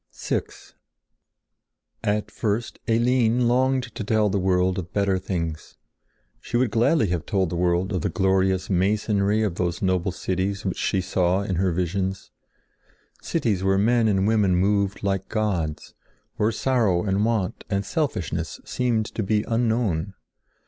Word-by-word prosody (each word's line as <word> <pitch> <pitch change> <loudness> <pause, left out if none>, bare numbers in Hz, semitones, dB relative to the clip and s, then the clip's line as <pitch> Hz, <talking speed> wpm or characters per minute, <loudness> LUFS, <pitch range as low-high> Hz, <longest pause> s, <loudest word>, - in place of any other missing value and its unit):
VI - - -1 1.6
At 105 0 -1
first 110 +1 -2
Eline 120 +1 +2
longed 130 +2 +2
to 110 - -5
tell 105 0 +2
the 100 - +1
world 90 0 +1
of 90 -1 -7
better 100 -2 +1
things. 85 -4 -4 0.6
She 120 - -2
would 125 -3 +1
gladly 115 - +2
have 85 -2 -1
told 95 -6 0
the - - -2
world 90 +2 +1
of 90 - -1
the - - 0
glorious 95 -1 +1
masonry 100 +2 +1
of 95 -6 -2
those 85 -1 -1
noble 95 -1 0
cities 95 +3 -2
which 95 - -2
she 95 - 0
saw 90 +1 +1
in 95 -3 -2
her 95 0 +2
visions—cities 95 - -4
where 95 0 +2
men 115 +3 +3
and 95 -2 +2
women 105 -4 +3
moved 100 +1 +1
like 95 -1 -1
gods; 90 -9 -2 0.4
where 105 +2 +1
sorrow 110 -9 +1
and 100 0 +1
want 110 -5 -1
and 100 0 -1
selfishness 90 - -2
seemed 120 -3 0
to 110 - -4
be 105 +1 +1
unknown. 110 -6 0
100 Hz, 145 wpm, -24 LUFS, 95-110 Hz, 1.6 s, men